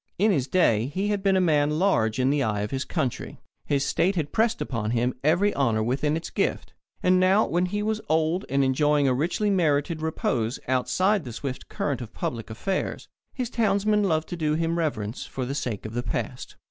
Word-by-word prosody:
In 210 Hz, +3 st, +3 dB
his 140 Hz, -8 st, 0 dB
day 120 Hz, -9 st, +3 dB
he 190 Hz, +8 st, -2 dB
had 205 Hz, -1 st, 0 dB
been 195 Hz, -1 st, +3 dB
a -, -, +4 dB
man 150 Hz, -4 st, +2 dB
large 125 Hz, -, +2 dB
in 130 Hz, +1 st, +2 dB
the 145 Hz, 0 st, +1 dB
eye 105 Hz, -5 st, 0 dB
of 105 Hz, -, -3 dB
his 135 Hz, 0 st, -2 dB
country. 140 Hz, -8 st, -3 dB, 0.3 s
His 140 Hz, -1 st, +1 dB
state 185 Hz, +4 st, +1 dB
had 155 Hz, -4 st, -2 dB
pressed 225 Hz, +1 st, +1 dB
upon 115 Hz, -4 st, -2 dB
him 120 Hz, +2 st, +1 dB
every 175 Hz, +7 st, +3 dB
honour 115 Hz, -6 st, +1 dB
within 140 Hz, +6 st, 0 dB
its 165 Hz, -, -7 dB
gift. -, -, -1 dB, 0.3 s
And 185 Hz, 0 st, +4 dB
now 190 Hz, +4 st, +4 dB
when 175 Hz, +2 st, 0 dB
he 205 Hz, +3 st, -2 dB
was 220 Hz, 0 st, -1 dB
old, 160 Hz, +4 st, +1 dB
and 140 Hz, 0 st, +2 dB
enjoying 145 Hz, +2 st, +2 dB
a 130 Hz, -, +3 dB
richly 175 Hz, +10 st, 0 dB
merited 155 Hz, -3 st, +1 dB
repose 125 Hz, -7 st, -1 dB
outside 185 Hz, +10 st, +1 dB
the 120 Hz, -4 st, -7 dB
swift 130 Hz, +2 st, -6 dB
current 135 Hz, -4 st, -2 dB
of 115 Hz, -, -9 dB
public 115 Hz, -2 st, -4 dB
affairs, 185 Hz, -, -3 dB, 0.3 s
his 250 Hz, -2 st, -3 dB
townsmen 210 Hz, -1 st, +2 dB
loved 160 Hz, -4 st, +1 dB
to 175 Hz, -, -3 dB
do 155 Hz, -2 st, 0 dB
him 165 Hz, +1 st, 0 dB
reverence 115 Hz, -8 st, -3 dB
for 130 Hz, -, -4 dB
the 135 Hz, -, -3 dB
sake 125 Hz, -8 st, -3 dB
of 110 Hz, -, -6 dB
the 120 Hz, -, -1 dB
past. 120 Hz, -, -4 dB
150 Hz, 210 wpm, -25 LUFS, 130-185 Hz, 0.3 s, a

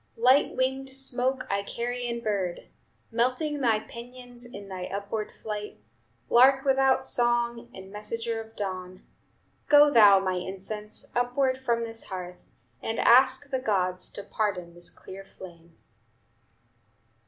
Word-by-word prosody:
"Light 255 Hz, +5 st, +4 dB
winged 265 Hz, +1 st, -1 dB
smoke, 265 Hz, -1 st, -1 dB
Icarian 235 Hz, +4 st, -3 dB
bird! 195 Hz, -5 st, -2 dB, 0.4 s
Melting 255 Hz, +6 st, 0 dB
thy 235 Hz, -5 st, +3 dB
pinions 245 Hz, +1 st, -9 dB
in 200 Hz, -2 st, -9 dB
thy 185 Hz, -2 st, -5 dB
upward 205 Hz, +2 st, -4 dB
flight, 210 Hz, -, -7 dB, 0.5 s
Lark 265 Hz, +3 st, +5 dB
without 270 Hz, -1 st, +3 dB
song, 240 Hz, -1 st, +1 dB
and 190 Hz, -2 st, -11 dB
messenger 225 Hz, +2 st, -3 dB
of 225 Hz, 0 st, -14 dB
dawn, 185 Hz, -2 st, -5 dB, 0.6 s
Go 295 Hz, 0 st, +7 dB
thou, 210 Hz, -6 st, +8 dB
my 185 Hz, -1 st, 0 dB
incense, 195 Hz, +4 st, -6 dB
upward 250 Hz, +2 st, +1 dB
from 235 Hz, -3 st, 0 dB
this 225 Hz, 0 st, -6 dB
hearth, 180 Hz, -1 st, -7 dB, 0.4 s
And 225 Hz, 0 st, -3 dB
ask 260 Hz, +3 st, +4 dB
the 260 Hz, -, 0 dB
gods 185 Hz, -6 st, -1 dB
to 200 Hz, -, -7 dB
pardon 195 Hz, -5 st, -2 dB
this 175 Hz, 0 st, -7 dB
clear 195 Hz, +1 st, -11 dB
flame." 170 Hz, -3 st, -14 dB
230 Hz, 125 wpm, -27 LUFS, 195-255 Hz, 0.6 s, thou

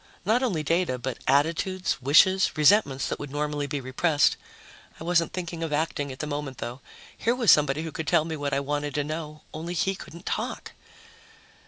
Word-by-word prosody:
Not 225 Hz, +5 st, +3 dB
only 190 Hz, -12 st, 0 dB
data, 165 Hz, -3 st, +1 dB
but 125 Hz, 0 st, -5 dB
attitudes, 165 Hz, +7 st, +1 dB
wishes, 185 Hz, +9 st, +4 dB
resentments 150 Hz, -4 st, +4 dB
that -, -, -3 dB
would 145 Hz, -, -6 dB
normally 145 Hz, 0 st, -2 dB
be 145 Hz, 0 st, -3 dB
repressed. 145 Hz, +4 st, +2 dB, 0.6 s
I -, -, -7 dB
wasn't 170 Hz, -1 st, +2 dB
thinking 170 Hz, -2 st, -5 dB
of 165 Hz, -2 st, -3 dB
acting 150 Hz, -2 st, -1 dB
at 130 Hz, -, -8 dB
the 150 Hz, -, -4 dB
moment, 145 Hz, -3 st, -4 dB
though. 125 Hz, +3 st, -6 dB, 0.3 s
Here 235 Hz, +2 st, 0 dB
was 235 Hz, -7 st, +5 dB
somebody 150 Hz, +1 st, +3 dB
who 160 Hz, -, -5 dB
could 160 Hz, 0 st, -5 dB
tell 155 Hz, -, +3 dB
me 160 Hz, -1 st, -4 dB
what 145 Hz, -1 st, -3 dB
I 140 Hz, 0 st, +1 dB
wanted 145 Hz, +1 st, -3 dB
to 145 Hz, -, +1 dB
know... 155 Hz, 0 st, -6 dB
only 165 Hz, +3 st, -5 dB
he 190 Hz, +4 st, +1 dB
couldn't 170 Hz, -2 st, -11 dB
talk. -, -, -3 dB
150 Hz, 190 wpm, -26 LUFS, 145-170 Hz, 0.6 s, was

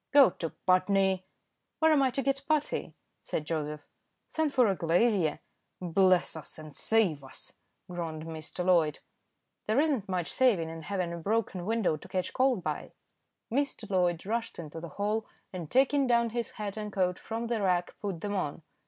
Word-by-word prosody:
"Go 280 Hz, -7 st, +8 dB
to 165 Hz, -, -4 dB, 0.2 s
Putney!" 190 Hz, 0 st, +3 dB, 0.5 s
"Where 320 Hz, 0 st, +4 dB
am 290 Hz, -, +4 dB
I 265 Hz, -, +4 dB
to 270 Hz, +2 st, -2 dB
get 275 Hz, +1 st, 0 dB
putty?" 305 Hz, -2 st, 0 dB, 0.3 s
said 150 Hz, -, -3 dB
Joseph. 150 Hz, -2 st, -3 dB, 0.4 s
"Send 315 Hz, -2 st, 0 dB
for 255 Hz, -3 st, +4 dB
a 195 Hz, -3 st, +2 dB
glazier." 175 Hz, -1 st, +2 dB, 0.4 s
"Bless 185 Hz, 0 st, +3 dB
us 155 Hz, -3 st, -5 dB
and 155 Hz, -2 st, -10 dB
save 190 Hz, -10 st, +2 dB
us!" 130 Hz, -, -9 dB, 0.3 s
groaned 165 Hz, -3 st, -4 dB
Mr. 160 Hz, +2 st, -5 dB
Loyd. 165 Hz, -5 st, +4 dB, 0.7 s
"There 220 Hz, +5 st, +3 dB
isn't 275 Hz, -10 st, +1 dB
much 180 Hz, -3 st, -1 dB
saving 205 Hz, -11 st, +3 dB
in 165 Hz, 0 st, -7 dB
having 180 Hz, 0 st, -2 dB
a -, -, -4 dB
broken 195 Hz, 0 st, -1 dB
window 220 Hz, -8 st, +1 dB
to -, -, -13 dB
catch 185 Hz, -1 st, -2 dB
cold 255 Hz, -7 st, +2 dB
by." 150 Hz, -2 st, -4 dB, 0.6 s
Mr. 265 Hz, -3 st, -1 dB
Loyd 175 Hz, -2 st, +1 dB
rushed 230 Hz, +3 st, -2 dB
into 160 Hz, -1 st, -7 dB
the 170 Hz, 0 st, -7 dB
hall, 210 Hz, +2 st, 0 dB, 0.3 s
and 170 Hz, -5 st, -5 dB
taking 275 Hz, +1 st, +3 dB
down 235 Hz, -1 st, +3 dB
his 235 Hz, 0 st, -3 dB
hat 210 Hz, -1 st, -5 dB
and 210 Hz, -1 st, -4 dB
coat 180 Hz, -2 st, 0 dB
from 230 Hz, +1 st, -4 dB
the 230 Hz, -2 st, -1 dB
rack, 180 Hz, -2 st, +1 dB
put 195 Hz, -5 st, -3 dB
them 205 Hz, 0 st, -2 dB
on. 165 Hz, -5 st, -2 dB
190 Hz, 175 wpm, -30 LUFS, 170-230 Hz, 0.7 s, Go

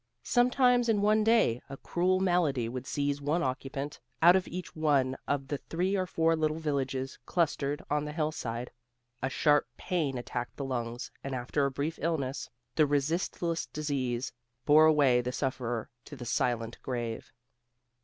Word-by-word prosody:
Sometimes 245 Hz, -1 st, +3 dB
in 205 Hz, -2 st, +2 dB
one 215 Hz, +1 st, +4 dB
day, 220 Hz, -, +3 dB
a 135 Hz, -, -7 dB
cruel 185 Hz, +5 st, +1 dB
malady 170 Hz, -10 st, +2 dB
would 125 Hz, +2 st, -5 dB
seize 145 Hz, 0 st, -1 dB
one 150 Hz, +5 st, +1 dB
occupant 135 Hz, +2 st, -3 dB, 0.2 s
out 175 Hz, +2 st, +7 dB
of 190 Hz, -, +1 dB
each 180 Hz, +1 st, -6 dB
one 140 Hz, -4 st, +2 dB
of 140 Hz, -1 st, -1 dB
the 145 Hz, -, -2 dB
three 185 Hz, +4 st, -1 dB
or 185 Hz, -1 st, 0 dB
four 165 Hz, -1 st, +2 dB
little 155 Hz, -1 st, 0 dB
villages 135 Hz, -4 st, -2 dB
clustered 150 Hz, -4 st, 0 dB
on 150 Hz, 0 st, 0 dB
the 150 Hz, -, -4 dB
hillside. 150 Hz, -7 st, -3 dB, 0.5 s
A 130 Hz, -, 0 dB
sharp 145 Hz, 0 st, +3 dB
pain 155 Hz, -8 st, -1 dB
attacked 120 Hz, 0 st, -4 dB
the 140 Hz, -, -3 dB
lungs, 120 Hz, -2 st, -4 dB
and 135 Hz, -1 st, -3 dB
after 130 Hz, +3 st, 0 dB
a -, -, -1 dB
brief 145 Hz, +4 st, -3 dB
illness 150 Hz, -4 st, -2 dB, 0.2 s
the 155 Hz, +2 st, +4 dB
resistless 165 Hz, +3 st, 0 dB
disease 135 Hz, -5 st, -2 dB, 0.3 s
bore 155 Hz, +2 st, +7 dB
away 140 Hz, -6 st, +5 dB
the 125 Hz, +1 st, -3 dB
sufferer 125 Hz, -4 st, -2 dB, 0.2 s
to 145 Hz, -, -9 dB
the 125 Hz, -3 st, -8 dB
silent 115 Hz, 0 st, -1 dB
grave. 120 Hz, -3 st, -4 dB
145 Hz, 160 wpm, -30 LUFS, 130-165 Hz, 0.5 s, out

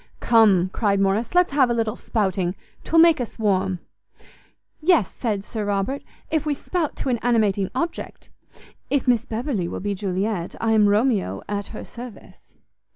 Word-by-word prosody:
"Come," 205 Hz, -6 st, +4 dB
cried 200 Hz, 0 st, 0 dB
Morrice, 200 Hz, -, 0 dB
"let's 360 Hz, -5 st, +4 dB
have 270 Hz, -4 st, +4 dB
a 235 Hz, -, +1 dB
little 225 Hz, -1 st, -1 dB
spouting; 190 Hz, -7 st, -1 dB, 0.3 s
'twill 330 Hz, -, 0 dB
make 330 Hz, -4 st, +6 dB
us 235 Hz, -, -6 dB
warm." 190 Hz, -3 st, +1 dB, 1.0 s
"Yes," 315 Hz, -, +3 dB
said 210 Hz, -5 st, -2 dB
Sir 215 Hz, +1 st, -5 dB
Robert, 205 Hz, +7 st, -1 dB, 0.3 s
"if 315 Hz, -2 st, +1 dB
we 300 Hz, -2 st, -1 dB
spout 330 Hz, +2 st, -2 dB
to -, -, -3 dB
an 240 Hz, -2 st, 0 dB
animating 210 Hz, -5 st, +1 dB
object. 335 Hz, 0 st, -4 dB, 0.6 s
If 280 Hz, -2 st, 0 dB
Miss 240 Hz, -1 st, +2 dB
Beverley 225 Hz, -, -2 dB
will -, -, -5 dB
be 205 Hz, +1 st, -2 dB
Juliet, 195 Hz, -1 st, -2 dB
I 225 Hz, -, +1 dB
am 210 Hz, -2 st, +5 dB
Romeo 205 Hz, -, +1 dB
at 205 Hz, -1 st, -3 dB
her 220 Hz, -, -8 dB
service." 240 Hz, -2 st, -12 dB
220 Hz, 160 wpm, -23 LUFS, 195-250 Hz, 1.0 s, make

